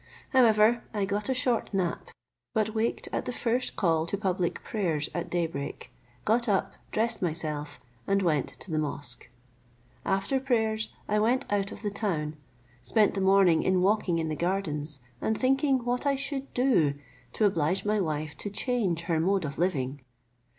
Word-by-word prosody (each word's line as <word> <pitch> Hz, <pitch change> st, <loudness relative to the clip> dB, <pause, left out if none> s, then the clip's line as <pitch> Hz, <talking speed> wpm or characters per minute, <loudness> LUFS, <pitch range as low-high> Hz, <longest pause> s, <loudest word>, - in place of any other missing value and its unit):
However, 230 Hz, -2 st, +5 dB
I 205 Hz, -2 st, +1 dB
got 205 Hz, +4 st, -1 dB
a -, -, +3 dB
short 250 Hz, -2 st, 0 dB
nap; 180 Hz, -3 st, -1 dB, 0.5 s
but 215 Hz, 0 st, +1 dB
waked 225 Hz, +1 st, -1 dB
at -, -, -1 dB
the -, -, -2 dB
first 245 Hz, +1 st, 0 dB
call 165 Hz, -3 st, +1 dB
to 200 Hz, -, -1 dB
public 185 Hz, -3 st, -1 dB
prayers 165 Hz, -9 st, -1 dB
at 175 Hz, -, -3 dB
day 175 Hz, -1 st, +1 dB
break, 140 Hz, -3 st, -6 dB, 0.3 s
got 235 Hz, +2 st, +2 dB
up, 195 Hz, -2 st, +1 dB, 0.2 s
dressed 225 Hz, +2 st, 0 dB
myself, 155 Hz, -4 st, -2 dB, 0.3 s
and 195 Hz, 0 st, +2 dB
went 155 Hz, -6 st, +2 dB
to 190 Hz, -, -7 dB
the 155 Hz, -, +1 dB
mosque. 145 Hz, -4 st, -5 dB, 0.7 s
After 195 Hz, +8 st, +1 dB
prayers 220 Hz, -4 st, 0 dB, 0.2 s
I 210 Hz, 0 st, +2 dB
went 245 Hz, +5 st, +2 dB
out 200 Hz, 0 st, 0 dB
of -, -, -9 dB
the 205 Hz, -, -1 dB
town, 160 Hz, -8 st, -1 dB, 0.5 s
spent 200 Hz, -, +3 dB
the 195 Hz, -, -2 dB
morning 190 Hz, -4 st, +5 dB
in 185 Hz, -1 st, +2 dB
walking 195 Hz, -3 st, +2 dB
in 165 Hz, -1 st, -1 dB
the 155 Hz, -, -2 dB
gardens, 155 Hz, -6 st, -2 dB, 0.2 s
and 220 Hz, -, 0 dB
thinking 270 Hz, -1 st, +2 dB
what 245 Hz, +3 st, 0 dB
I 280 Hz, -, +3 dB
should 275 Hz, 0 st, -3 dB
do 235 Hz, -, +3 dB, 0.4 s
to 215 Hz, -, +2 dB
oblige 180 Hz, 0 st, +1 dB
my 210 Hz, 0 st, +2 dB
wife 155 Hz, -3 st, -2 dB
to 205 Hz, -, -3 dB
change 200 Hz, -5 st, 0 dB
her 170 Hz, -2 st, 0 dB
mode 190 Hz, +1 st, +2 dB
of 140 Hz, 0 st, -5 dB
living. 140 Hz, -6 st, 0 dB
195 Hz, 170 wpm, -28 LUFS, 160-220 Hz, 0.7 s, However